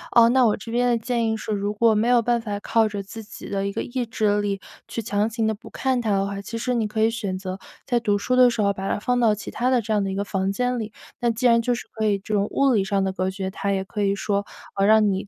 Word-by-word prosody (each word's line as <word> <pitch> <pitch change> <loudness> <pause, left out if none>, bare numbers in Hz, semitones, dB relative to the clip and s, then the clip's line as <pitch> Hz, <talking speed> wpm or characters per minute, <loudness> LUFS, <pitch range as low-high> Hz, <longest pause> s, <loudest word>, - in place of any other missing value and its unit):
呃， 235 -1 +8
那 260 +1 +4
我 210 - +1
这 225 +3 -9
边 245 +1 +2
的 235 - +3
建 230 0 -1
议 220 - 0
是， 220 - -5
如 205 0 -1
果 225 +1 +4
没 215 +3 +2
有 245 -1 +5
办 240 0 +1
法 205 -2 -4
靠 225 +1 +2
着 205 -1 -4
自 220 +3 -9
己 210 - -10
的 195 0 -1
一 200 - -2
个 - - -3
意 250 0 -3
志 210 -2 +1
力， 200 -1 -2 0.3
去 - - -5
强 210 0 0
行 225 0 -1
地 220 - +1
不 215 +3 -12
看 260 -2 0
它 225 - -2
的 195 0 +2
话， 200 0 -4
其 230 +3 -6
实 250 +2 -1
你 225 -3 0
可 220 +1 -1
以 225 - +3
选 200 -5 -3
择 190 0 -6 0.3
在 240 -2 +1
读 210 -3 +1
书 250 +5 0
的 250 -1 +7
时 235 -2 -1
候 200 0 +2
把 195 0 -4
它 - - 0
放 245 +3 0
到 220 -3 +4
其 210 - -8
他 250 +2 0
的 255 -1 +3
这 220 0 -2
样 205 -1 +2
的 195 - -2
一 - - -3
个 200 - -1
房 195 -1 -1
间 250 +4 -1
里。 220 -1 -5 0.3
那 240 - +1
既 230 +3 -2
然 235 -1 +5
就 245 +1 0
是 - - -8
可 220 -1 -2
以 205 -1 +2
这 200 +2 -6
种 205 0 +2
物 275 -2 +2
理 205 - +3
上 195 0 0
的 190 0 -1
隔 185 0 -1
绝， 190 0 -4
它 200 +1 -2
也 190 -1 0
可 210 +2 -5
以 200 -1 +2
说， 200 0 -1 0.3
呃， 195 0 +2
让 215 -1 +5
你 190 +1 -3
215 Hz, 335 characters per minute, -23 LUFS, 200-235 Hz, 0.3 s, 呃